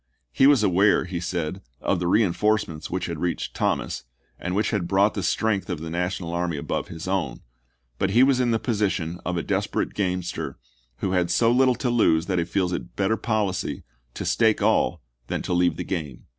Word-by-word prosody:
He 135 - +5
was 140 -6 +5
aware, 100 +1 +4
he 90 -1 -4
said, 90 +1 -3 0.2
of - - 0
the 90 - -1
reinforcements 105 -3 +1
which 95 +1 -2
had 85 -3 -4
reached 90 +1 -2
Thomas, - - -1 0.4
and 90 +1 -3
which 105 +2 +1
had 100 -6 -1
brought 100 +3 +3
the 100 - -3
strength 100 +2 0
of 90 -4 -2
the 80 +1 -6
National 90 0 -2
army 85 -2 -1
above 70 - -3
his 80 +2 -7
own, 90 -11 -1 0.6
but 95 - +1
he 115 +6 +5
was 135 -1 +4
in 125 -1 +2
the 115 - +3
position 100 -7 -1
of 90 -1 -2
a 85 - -1
desperate - - -1
gamester 90 -7 -2 0.4
who 95 - 0
has 90 -2 +1
so 115 +6 +4
little 130 0 +4
to 125 -1 -1
lose 80 -9 +3
that 90 -3 0
he 85 - 0
feels 90 0 0
it - - -5
better 100 +3 +1
policy 105 -5 -1 0.3
to - - -4
stake 110 -2 +3
all 100 -7 +2 0.2
than - - -2
to - - -2
leave 90 -2 +2
the 90 - -3
game. 80 -8 -5
90 Hz, 200 wpm, -24 LUFS, 85-105 Hz, 0.6 s, He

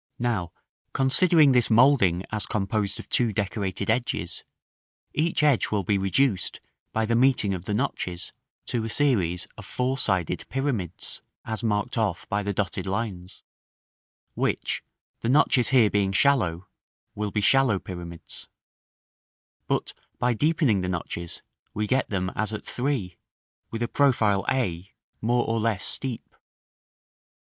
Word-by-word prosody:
Now, 110 -8 -1 0.4
considering 150 +2 +5
this 125 -3 +3
moulding 110 -7 +4
as 110 -1 +1
composed 100 -1 -1
of - - -9
two 120 -3 +2
decorated 100 -1 -2
edges, 115 -7 -2 0.7
each 155 0 +1
edge 145 -6 +3
will 105 -2 0
be 100 +2 +1
reduced, 95 +1 +1 0.3
by 110 0 0
the 115 - 0
meeting 120 -5 +3
of 90 -1 -5
the 105 - -1
notches, 95 -7 -3 0.3
to 120 -3 -1
a 115 - -3
series 105 - +2
of - - -9
four 130 +2 -1
sided 95 - -1
pyramids 125 - -2 0.2
(as 110 +1 -3
marked 105 0 0
off 100 -6 -1
by 100 +1 0
the 100 0 -2
dotted 100 0 -2
lines), 95 -3 -4 0.9
which, - - -1 0.4
the 115 - -2
notches 130 -2 +4
here 125 -6 +5
being 100 -2 +1
shallow, 95 -9 +2 0.5
will 105 0 -2
be 105 - -1
shallow 130 -1 +4
pyramids; 85 -3 -8 1.2
but - - -1 0.2
by 125 0 +1
deepening 145 - +2
the 90 - -2
notches, 85 -1 -5 0.3
we 105 - 0
get 130 +4 +1
them 95 -2 -1
as 110 +1 -1
at 110 - -6
3, 125 -9 -2 0.5
with 115 +1 -3
a - - 0
profile 115 -9 +2
a, 95 -8 -1 0.3
more 120 +2 +2
or 115 0 0
less 110 -3 0
steep. 130 -4 -3
110 Hz, 140 wpm, -26 LUFS, 95-125 Hz, 1.2 s, considering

